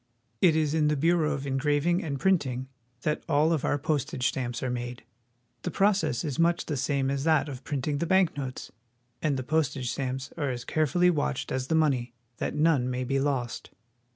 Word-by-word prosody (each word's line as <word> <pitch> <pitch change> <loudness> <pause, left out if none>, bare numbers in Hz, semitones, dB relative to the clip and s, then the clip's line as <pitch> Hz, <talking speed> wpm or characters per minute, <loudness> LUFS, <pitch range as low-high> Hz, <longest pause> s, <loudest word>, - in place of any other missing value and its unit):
It 170 -4 +5
is 155 -2 +1
in 155 -2 +3
the 150 - +2
Bureau 165 +1 +2
of 140 -2 -3
Engraving 145 +6 +1
and 140 -4 -3
Printing 130 -9 +1 0.4
that 150 0 -1
all 155 +2 +3
of 155 - -1
our 145 - +1
postage 140 -3 0
stamps 120 -2 -3
are 130 - -1
made. 120 0 -5 0.6
The - - -3
process 195 - +1
is 145 -4 -3
much 170 +1 +2
the 150 - -2
same 135 0 0
as 140 0 -1
that 155 -2 +3
of 135 -2 -7
printing 145 +1 -2
the 170 - -1
bank 190 -1 +3
notes, 135 -3 -5 0.5
and 145 -3 +1
the 130 - -3
postage 140 -4 0
stamps 130 +1 -4
are 145 - -1
as 125 -1 -4
carefully 175 +4 +3
watched 145 -4 -2
as 130 0 -2
the 160 - +1
money, 130 -7 +1 0.2
that - - -3
none 150 -5 +3
may 125 0 -2
be 135 +2 0
lost. 135 -4 -2
145 Hz, 195 wpm, -28 LUFS, 130-160 Hz, 0.6 s, It